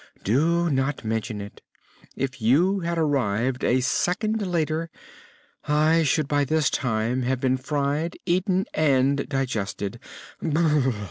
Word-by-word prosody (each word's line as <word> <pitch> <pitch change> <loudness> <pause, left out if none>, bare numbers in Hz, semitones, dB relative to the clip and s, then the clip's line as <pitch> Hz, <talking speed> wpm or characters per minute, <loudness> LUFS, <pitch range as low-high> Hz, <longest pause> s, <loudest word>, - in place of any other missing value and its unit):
"Do 165 - +2
not 135 -2 -1
mention 110 -1 -2
it! 100 - -10 0.5
If 130 -1 -4
you 170 - +3
had 170 -1 -2
arrived 130 -5 0
a 130 +1 +2
second 215 - 0
later 165 -1 -1 0.8
I 155 +2 +3
should 155 -1 +1
by 145 -1 +2
this 155 +1 +1
time 115 +1 0
have 130 +1 -1
been 130 0 +1
fried, 145 +4 -2
eaten 185 +1 +1
and 140 -2 +2
digested. 115 -5 -3
140 Hz, 120 wpm, -24 LUFS, 125-165 Hz, 0.8 s, you